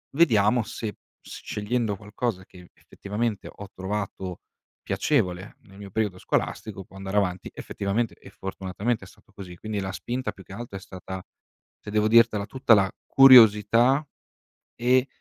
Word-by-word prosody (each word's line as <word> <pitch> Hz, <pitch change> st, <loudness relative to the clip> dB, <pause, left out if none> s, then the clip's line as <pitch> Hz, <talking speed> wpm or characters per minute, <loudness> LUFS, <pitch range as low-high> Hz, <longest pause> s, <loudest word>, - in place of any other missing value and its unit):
"Vediamo 120 Hz, -7 st, +4 dB
se 110 Hz, 0 st, -6 dB, 0.2 s
s -, -, -11 dB
scegliendo 105 Hz, 0 st, -2 dB
qualcosa 105 Hz, -1 st, -4 dB
che 90 Hz, -1 st, -16 dB
effettivamente 105 Hz, 0 st, -4 dB
ho 100 Hz, -, -9 dB
trovato 95 Hz, -1 st, -4 dB, 0.4 s
piacevole 90 Hz, +2 st, -1 dB
nel 95 Hz, -1 st, -17 dB
mio 100 Hz, -1 st, -10 dB
periodo 105 Hz, -3 st, -1 dB
scolastico, 100 Hz, +1 st, -3 dB
può 95 Hz, -, -19 dB
andare 95 Hz, +1 st, -4 dB
avanti 90 Hz, -2 st, -1 dB
effettivamente", 105 Hz, +4 st, -2 dB
e -, -, -15 dB
fortunatamente 95 Hz, +4 st, -4 dB
è -, -, -11 dB
stato 95 Hz, -, -21 dB
così. 90 Hz, -3 st, -9 dB
Quindi 110 Hz, 0 st, -4 dB
la 95 Hz, 0 st, -4 dB
spinta 125 Hz, +6 st, -4 dB
più 95 Hz, -, -15 dB
che -, -, -12 dB
altro 115 Hz, -1 st, -7 dB
è -, -, -8 dB
stata, 95 Hz, -1 st, -8 dB, 0.6 s
se 105 Hz, -, -10 dB
devo 105 Hz, 0 st, +2 dB
dirtela 115 Hz, -2 st, +4 dB
tutta, 130 Hz, 0 st, +3 dB
la 100 Hz, -3 st, +4 dB, 0.2 s
curiosità, 120 Hz, 0 st, +7 dB, 0.8 s
e 125 Hz, +2 st, +3 dB
105 Hz, 150 wpm, -25 LUFS, 95-115 Hz, 0.8 s, curiosità